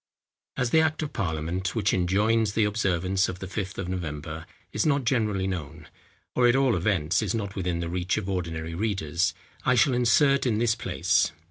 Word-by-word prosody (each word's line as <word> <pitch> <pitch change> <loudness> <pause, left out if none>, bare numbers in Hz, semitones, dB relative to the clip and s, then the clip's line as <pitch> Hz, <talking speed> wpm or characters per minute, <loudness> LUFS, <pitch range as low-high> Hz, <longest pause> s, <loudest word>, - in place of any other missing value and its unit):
As 125 -2 0
the 160 - +5
Act 160 0 0
of 150 - -5
Parliament 90 0 -2
which 110 - +1
enjoins 105 +4 +2
the 110 - +2
observance 95 -2 +1
of 90 - -5
the 95 - -7
Fifth 95 +1 -5
of 95 - -3
November 80 -3 -5 0.3
is - - +1
not 145 -3 +2
generally 105 -6 +1
known, 80 -4 -5 0.4
or 125 -1 +4
at 120 - +4
all 135 -4 +3
events 90 -2 +1
is 110 0 -1
not 100 -3 -4
within 90 -3 -2
the 85 - -3
reach 90 +2 -1
of 105 -3 -3
ordinary 85 -4 -3
readers, 90 -3 -1 0.3
I 130 - +3
shall 125 +3 +4
insert 130 +3 +3
in 110 -3 +1
this 115 0 +2
place. - - +1
95 Hz, 190 wpm, -26 LUFS, 85-115 Hz, 0.4 s, the